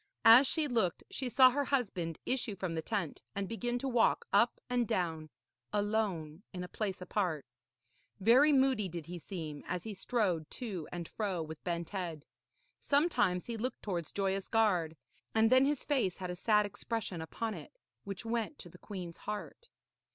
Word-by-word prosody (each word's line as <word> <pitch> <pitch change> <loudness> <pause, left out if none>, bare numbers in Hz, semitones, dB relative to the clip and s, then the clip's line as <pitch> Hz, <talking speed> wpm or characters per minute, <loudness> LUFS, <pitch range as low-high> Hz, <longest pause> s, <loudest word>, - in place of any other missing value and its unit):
As 240 +4 +9
she 315 -2 +1
looked, 225 -9 0
she 260 -2 -2
saw 255 +2 +7
her 285 +2 0
husband 195 - -1
issue 245 -5 -1
from 185 -3 -3
the 160 - -1
tent 195 -4 -3
and 200 -1 -2
begin 240 +2 -2
to 270 - -3
walk 240 -3 +3
up 235 0 +4
and 245 -2 +1
down 160 -5 -1 0.4
alone 205 -6 -1
in 180 -2 -5
a - - -5
place 190 -2 -3
apart. 180 -6 -1 0.7
Very 250 +9 +6
moody 265 -8 +3
did 170 -2 -6
he 175 +2 -7
seem, 160 -5 -6
as 180 -1 -2
he 220 - -5
strode 190 -6 0
to 195 -10 -5
and 175 -2 -5
fro 195 -6 -2
with 160 0 -9
bent 170 -2 -3
head. 170 -6 -4 0.5
Sometimes 245 - +2
he 235 -1 -4
looked 250 +4 -3
towards 175 -6 -3
Joyous 195 -1 -1
Gard, 180 -8 +2 0.4
and 220 +1 +4
then 260 +1 +7
his 290 -1 0
face 250 -11 +1
had 180 -2 -4
a - - -4
sad 210 +3 +3
expression 205 -3 -4
upon 220 +7 -3
it - - -10 0.3
which 195 +1 -6
went 230 +4 -2
to 175 - -9
the 180 - -15
queen's 180 -5 -7
heart. 210 - -6
205 Hz, 175 wpm, -33 LUFS, 175-235 Hz, 0.7 s, As